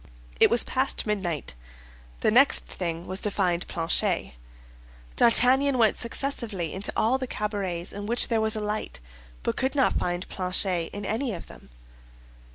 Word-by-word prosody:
It - - +6
was 235 - +3
past 260 +1 0
midnight; 190 - -3 0.7
the 215 - +2
next 270 +5 +5
thing 170 -1 -5
was 190 +2 -3
to 210 - 0
find 180 -4 -1
Planchet. 170 - 0 0.8
D'Artagnan 255 +3 +4
went 225 -3 +3
successively 230 - -3
into 190 +2 -3
all 250 +4 +2
the 260 - -4
cabarets 195 -6 -4
in 205 +1 -6
which 235 +2 +5
there 225 -2 0
was 220 0 0
a 215 - -3
light, 210 - -4 0.4
but - - -2
could 265 +2 -1
not 270 - +2
find 175 +1 -2
Planchet 180 -2 0
in 205 0 -6
any 225 0 -2
of 170 - -9
them. - - -14
210 Hz, 160 wpm, -26 LUFS, 180-235 Hz, 0.8 s, It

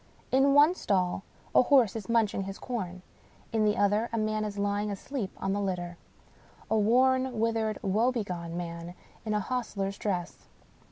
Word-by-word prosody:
In 275 +2 +4
one 295 +4 +7
stall 185 - 0 0.3
a - - +7
horse 250 -5 +4
is 220 -2 -6
munching 215 -4 +1
his 195 0 -6
corn. 185 -7 -5 0.5
In 220 -1 +2
the 210 0 +2
other 205 +3 +2
a 230 - -2
man 215 0 0
is 205 -1 -4
lying 205 +1 0
asleep 205 +2 -4
on 195 - -1
the 205 - -1
litter. 175 -3 -3 0.8
A - - +4
worn, 255 +3 +3
withered, 225 -1 0
woebegone 195 -5 -1
man 170 0 -6 0.3
in 215 -1 0
a - - +2
hostler's 200 -3 -3
dress. 180 -4 -3
210 Hz, 160 wpm, -29 LUFS, 195-230 Hz, 0.8 s, one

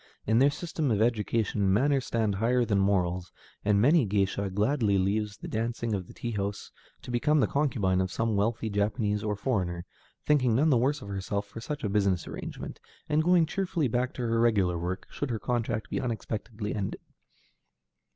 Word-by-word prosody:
In 110 +2 +3
their 140 +2 +6
system 160 -1 -2
of 105 -3 +1
education, 110 -3 +1
manners 135 +5 +2
stand 110 -3 +1
higher 120 +5 +2
than 105 -3 +1
morals, 90 -2 +1 0.3
and 105 -1 +3
many 150 +9 +5
a 115 - -1
géisha 100 0 0
gladly 105 0 +2
leaves 105 +2 0
the - - -8
dancing 115 0 -2
in 95 -3 -3
the - - -12
tea 120 - -4
houses 100 -1 -3 0.3
to - - -7
become 150 +6 +2
the - - +4
concubine 105 -11 +1
of 95 0 -2
some 115 0 0
wealthy 110 +3 0
Japanese 105 0 0
or 105 -1 -1
foreigner, 95 -6 -1 0.4
thinking 130 -6 +3
none 150 +5 +3
the - - +5
worse 140 +5 +1
of 100 - -9
herself 100 +1 -2
for 115 +3 -9
such 145 +5 -5
a 105 - 0
business 100 -3 +1
arrangement, - - -7 0.3
and 150 +1 +3
going 175 -1 +5
cheerfully 170 -3 -1
back 125 +2 0
to 125 - -3
her 115 -1 +1
regular 100 -7 +3
work, 90 +2 -3
should 145 - -3
her 115 - -1
contract 115 -1 -2
be - - -1
unexpectedly 110 -2 -4
ended. 100 -2 -3
110 Hz, 190 wpm, -28 LUFS, 100-125 Hz, 0.4 s, their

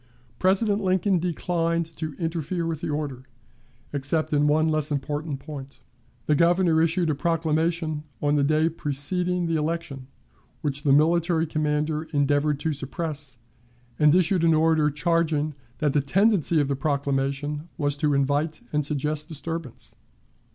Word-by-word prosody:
President 200 +3 +2
Lincoln 185 0 +2
declined 170 -1 -1
to 155 -2 -4
interfere 165 +1 -2
with 165 -2 -3
the - - -3
order, 140 -4 -4 0.7
except 145 +3 -1
in 145 0 +3
one 155 +2 +3
less 155 -1 0
important 145 +1 -3
point. 140 -2 -9 0.5
The 150 - +2
Governor 170 +1 +3
issued 165 0 +1
a - - +1
proclamation 160 0 0 0.2
on 145 0 +1
the 145 - +3
day 155 +2 +3
preceding 170 +4 -1
the 165 -1 0
election, 150 -4 -3 0.5
which 140 -3 -2
the 145 - +2
military 165 +3 +3
commander 150 0 -1
endeavored 145 0 +2
to 155 0 0
suppress, 145 -1 -5 0.6
and 150 +1 +5
issued 180 -1 +3
an 165 -1 +5
order 155 -1 +3
charging 155 -1 0 0.2
that 150 0 0
the 145 - +3
tendency 175 +2 +2
of 145 - +1
the 140 - 0
proclamation 140 +2 -1
was 145 -3 0
to 145 -1 +1
invite 145 +3 0
and 150 0 +1
suggest 150 +1 -2
disturbance. 165 -3 -6
155 Hz, 145 wpm, -25 LUFS, 145-165 Hz, 0.7 s, and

